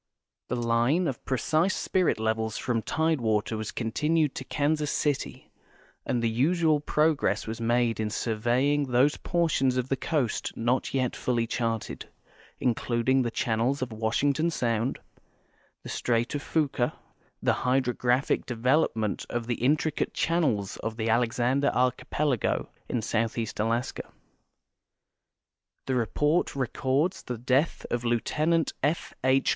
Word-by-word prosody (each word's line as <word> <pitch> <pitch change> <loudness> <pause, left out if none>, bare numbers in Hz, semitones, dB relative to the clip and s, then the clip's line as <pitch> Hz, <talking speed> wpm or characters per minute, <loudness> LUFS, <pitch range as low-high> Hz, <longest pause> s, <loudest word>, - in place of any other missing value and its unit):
Tlie 120 -1 -1
line 120 +10 +2
of 130 - -4
preci.se 155 +7 +1
spirit 185 - +1
levels 110 0 -1
from 120 -3 -1
tidewater 115 -9 0
was 110 -1 -4
continued 150 +6 0
to - - -5
Kansas 150 +2 0
City, 145 -3 -2 0.6
and 120 -1 0
the 115 - +2
usual 155 +5 +2
progress 150 +1 +1
was 110 +1 -5
made 120 0 +1
in 110 -1 0
surveying 120 +7 +1
those 130 +3 +3
portions 155 -7 +1
of 125 +1 -1
the 135 - +2
coasts 135 -5 -1
not 120 +4 0
yet 130 -2 0
fully 120 -2 0
charted, 115 -1 -3 0.5
including 125 +2 +1
the 120 - 0
channels 120 +4 0
of 125 - -5
Washington 140 +8 +1
sound, 120 -4 -1 0.9
the - - -8
strait 120 0 0
of 145 - -2
Fuca, 145 -4 -1
and - - -5 0.5
the - - +5
hydrographic 125 0 +1
development 120 -3 0
of 120 -1 -2
the 120 -1 -3
intricate 150 +3 +1
channels 140 - 0
of 115 0 -5
the 115 0 -1
.Alexander 120 +4 +2
archipelago 125 +1 0 0.2
in 120 -3 -1
southeast 115 0 -1
Alaska. 115 +4 -1 1.7
The 130 - -1
report 145 +8 +1
records 135 +6 0
the 125 - -5
death 130 +7 +1
of 120 0 -1
Lieut. 120 -1 0 0.5
F. 150 +5 -1
H. 130 +1 +3
125 Hz, 130 wpm, -27 LUFS, 115-145 Hz, 1.7 s, the